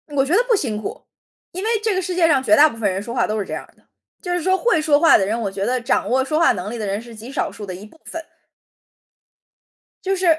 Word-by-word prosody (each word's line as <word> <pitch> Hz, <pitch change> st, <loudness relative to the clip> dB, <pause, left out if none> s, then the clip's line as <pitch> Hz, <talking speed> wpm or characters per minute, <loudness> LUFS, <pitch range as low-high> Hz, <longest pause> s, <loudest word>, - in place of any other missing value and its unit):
我 270 Hz, -1 st, +3 dB
觉 295 Hz, -, -1 dB
得 470 Hz, +6 st, +4 dB
不 465 Hz, -, +4 dB
辛 235 Hz, -, -2 dB
苦。 -, -, -7 dB, 0.5 s
因 370 Hz, +3 st, -5 dB
为 440 Hz, -, 0 dB
这 435 Hz, -3 st, +1 dB
个 370 Hz, -, 0 dB
世 365 Hz, 0 st, -4 dB
界 345 Hz, -2 st, +4 dB
上 275 Hz, -4 st, +3 dB
绝 320 Hz, -, +5 dB
大 305 Hz, +1 st, +7 dB
部 230 Hz, -, -11 dB
分 205 Hz, -4 st, 0 dB
人 190 Hz, -, -3 dB
说 235 Hz, +3 st, -6 dB
话 245 Hz, -, +2 dB
都 215 Hz, 0 st, -2 dB
是 200 Hz, -, -2 dB
这 -, -, -7 dB
样 -, -, -4 dB
儿 -, -, -22 dB
的， -, -, -29 dB, 0.4 s
就 355 Hz, -, -4 dB
是 355 Hz, -, -1 dB
说 375 Hz, +3 st, +2 dB
会 445 Hz, -7 st, +2 dB
说 295 Hz, -1 st, +3 dB
话 330 Hz, 0 st, +6 dB
的 190 Hz, -, 0 dB
人 220 Hz, +4 st, -1 dB
我 200 Hz, -, -1 dB
觉 195 Hz, 0 st, -3 dB
得 250 Hz, +2 st, 0 dB
掌 235 Hz, -, 0 dB
握 260 Hz, +1 st, +2 dB
说 305 Hz, +3 st, -1 dB
话 335 Hz, -, +5 dB
能 185 Hz, +2 st, -4 dB
力 240 Hz, -, -5 dB
的 215 Hz, -, -4 dB
人 200 Hz, +2 st, -2 dB
是 235 Hz, -1 st, -12 dB
极 230 Hz, +5 st, -10 dB
少 -, -, -2 dB
数 210 Hz, -, -9 dB
的 185 Hz, -, -6 dB
一 195 Hz, +4 st, -9 dB
部 320 Hz, +9 st, -19 dB
分。 330 Hz, -, -6 dB, 1.8 s
就 390 Hz, +1 st, +1 dB
是 375 Hz, 0 st, -2 dB
265 Hz, 320 characters per minute, -20 LUFS, 215-345 Hz, 1.8 s, 大